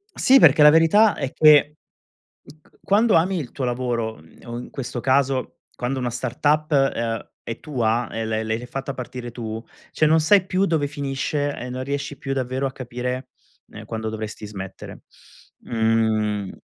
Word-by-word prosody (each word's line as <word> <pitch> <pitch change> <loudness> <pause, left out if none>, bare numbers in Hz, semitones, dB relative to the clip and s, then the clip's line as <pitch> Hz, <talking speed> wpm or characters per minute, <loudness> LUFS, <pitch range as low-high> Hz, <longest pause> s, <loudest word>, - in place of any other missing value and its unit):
Sì, 265 +1 +5
perché 155 - +6
la 150 - +10
verità 165 +5 +5
è 135 - -3
che, 150 -1 +5 0.7
m - - -15
c - - -27
quando 215 +3 +3
ami 180 +3 +2
il 140 -7 -5
tuo 135 - -4
lavoro 120 -4 -2 0.2
o, 120 0 -6
in 125 - -9
questo 125 -2 -5
caso, 130 0 +1 0.2
quando 125 +2 -3
una 125 -1 -2
startup, 145 +6 0
uhm, 115 -6 0
è 115 - -6
tua, 120 -5 -1
e 115 0 -3
l' 110 0 -2
l’hai 115 +2 -3
fatta 135 +2 -5
partire 125 -1 -7
tu, 110 -2 -5 0.3
cioè, 155 - +2
non 160 +1 +4
sai 185 +4 +4
più 185 +1 +1
dove 160 -4 +1
finisce 145 0 -2
e 125 - -6
non 130 +1 -4
riesci 140 +1 -4
più, 135 0 -3
davvero, 130 +1 -2
a 135 - -4
capire, 125 +1 -5 0.4
ehm, - - -10
quando 110 -1 -4
dovresti 110 -1 -6
smettere. 95 -2 -9 0.6
Mhmm 110 -3 0
130 Hz, 170 wpm, -22 LUFS, 115-145 Hz, 0.7 s, la